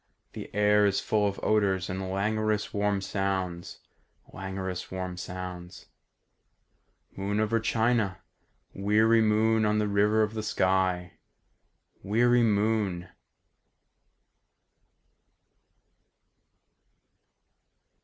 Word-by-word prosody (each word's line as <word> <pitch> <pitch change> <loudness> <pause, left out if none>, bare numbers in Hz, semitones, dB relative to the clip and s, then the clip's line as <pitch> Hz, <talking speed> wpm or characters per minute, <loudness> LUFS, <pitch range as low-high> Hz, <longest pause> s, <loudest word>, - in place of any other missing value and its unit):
The - - -8
air 105 0 +4
is 100 - +1
full 105 -1 +1
of 100 - -4
odours 100 -4 +1
And 95 0 -4
languorous 105 +2 -1
warm 100 -1 0
sounds... 95 -3 -3 0.5
languorous 95 -1 -5
warm 95 -1 -5
sounds. 90 0 -8 1.3
"Moon 100 +2 -2
over 110 +1 +1
China, 110 -3 0 0.6
Weary 110 +3 +3
moon 110 +1 +2
on 105 0 +2
the 105 0 +1
river 105 +2 +2
of 105 0 -2
the 110 - -3
sky... 95 -3 0 0.8
weary 120 +4 +3
moon!" 105 -5 0
100 Hz, 85 wpm, -27 LUFS, 95-110 Hz, 1.3 s, air